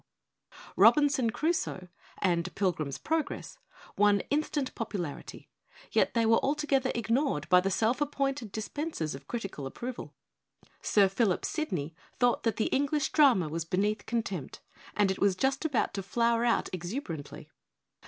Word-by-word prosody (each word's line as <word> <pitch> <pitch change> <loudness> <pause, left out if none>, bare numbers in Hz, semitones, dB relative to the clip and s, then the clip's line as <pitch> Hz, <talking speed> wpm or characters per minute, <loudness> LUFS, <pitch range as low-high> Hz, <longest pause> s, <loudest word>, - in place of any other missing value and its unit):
l - - -17
Robinson 290 -5 +5
Crusoe' 270 - -1 0.4
and 170 -3 0
'Pilgrim's 160 -8 -1
Prog 320 0 -1
ress' - - -8 0.4
won 205 -1 +4
instant 290 -2 -1
popularity, 190 -9 -5 0.4
yet - - +2
they 230 -1 +3
were 225 0 +5
altogether 280 -2 +1
ignored 235 - 0
by 180 -1 +7
the 195 - 0
self 225 +7 +1
appointed 275 -5 -1
dis 220 +1 -4
pensers 290 - -3
of 135 +1 -10
critical 195 - -5
approval. 240 - -7 0.7
Sir 200 -2 +4
Philip 195 -1 0
Sidney 180 - -3 0.2
thought 245 -2 +2
that 225 -3 0
the 220 - 0
English 285 +2 +1
drama 260 - +5
was 165 +2 -3
beneath 200 +5 -1
contempt; 200 - -3 0.4
and 200 -1 +3
it 190 - -4
was 200 -2 +3
just 270 +8 0
about 280 -7 0
to 195 - -3
flower 235 +4 +1
out 235 - +2
exuberantly. 175 - -6
225 Hz, 145 wpm, -29 LUFS, 185-275 Hz, 0.7 s, by